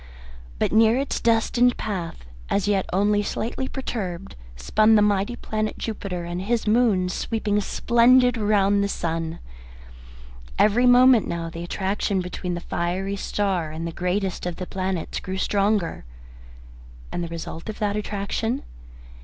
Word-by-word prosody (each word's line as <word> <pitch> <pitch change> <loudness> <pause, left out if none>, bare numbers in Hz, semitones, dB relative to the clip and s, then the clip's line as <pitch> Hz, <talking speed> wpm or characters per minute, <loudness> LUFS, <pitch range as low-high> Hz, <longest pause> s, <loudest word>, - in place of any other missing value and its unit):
But - - 0
near 225 +2 +5
its 275 +1 -1
destined 235 +2 +2
path, 175 - -5 0.2
as 200 0 0
yet 200 -2 +1
only 205 +2 +2
slightly 235 +5 -3
perturbed, 195 -10 -5 0.2
spun 215 - +3
the 210 - +5
mighty 205 +3 +1
planet 215 -2 -3
Jupiter 200 -5 -4
and 175 +1 -4
his 230 +4 -1
moons 210 -5 +2
sweeping 210 -2 -1
splendid 245 +3 +4
round 205 -2 +2
the - - +1
sun. 165 -2 -3 1.2
Every 235 +4 +4
moment 245 -2 +6
now 165 -1 -4
the 170 +1 -6
attraction 195 +2 -1
between 180 0 -4
the 175 - -5
fiery 185 +4 -2
star 195 -4 -1
and 160 +2 -5
the 170 - -3
greatest 180 +2 -2
of 175 - -3
the 185 - -5
planets 185 -2 -3
grew 190 +1 -5
stronger. 200 -2 0 1.1
And 175 - -3
the - - -3
result 165 +3 -7
of 215 - -5
that 205 -1 -1
attraction? 210 +4 -2
200 Hz, 145 wpm, -24 LUFS, 180-220 Hz, 1.2 s, moment